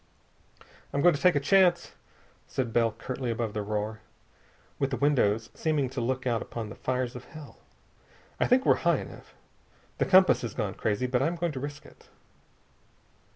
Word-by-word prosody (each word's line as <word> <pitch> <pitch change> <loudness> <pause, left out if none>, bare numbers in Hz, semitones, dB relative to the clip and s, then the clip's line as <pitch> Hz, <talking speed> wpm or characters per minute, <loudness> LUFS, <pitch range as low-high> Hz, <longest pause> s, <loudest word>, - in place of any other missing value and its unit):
"I'm 140 - -1
going 175 - +6
to 145 - -4
take 180 -2 +4
a - - +3
chance," 175 +3 +3 0.6
said 125 -4 -3
Bell 115 -1 +3
curtly 125 +3 -5
above 115 -2 -2
the 105 - -2
uproar, 105 +1 -3 0.8
with 135 - +1
the 130 - -2
windows 115 -6 +1
seeming 150 -5 -1
to 130 -2 -3
look 130 +2 -2
out 120 -3 0
upon 115 -3 -6
the - - -9
fires 125 -1 -2
of 125 - -9
hell. 155 -3 -12 0.8
"I - - +2
think 255 +1 +3
we're - - +5
high - - +3
enough. - - -10 0.6
The - - +2
compass 185 0 +5
has 120 - -5
gone 105 -5 -2
crazy, 105 +3 -1
but 125 0 0
I'm 165 +5 0
going 170 -1 -1
to 135 - -6
risk 145 +2 -7
it." - - -18
130 Hz, 180 wpm, -28 LUFS, 115-150 Hz, 0.8 s, going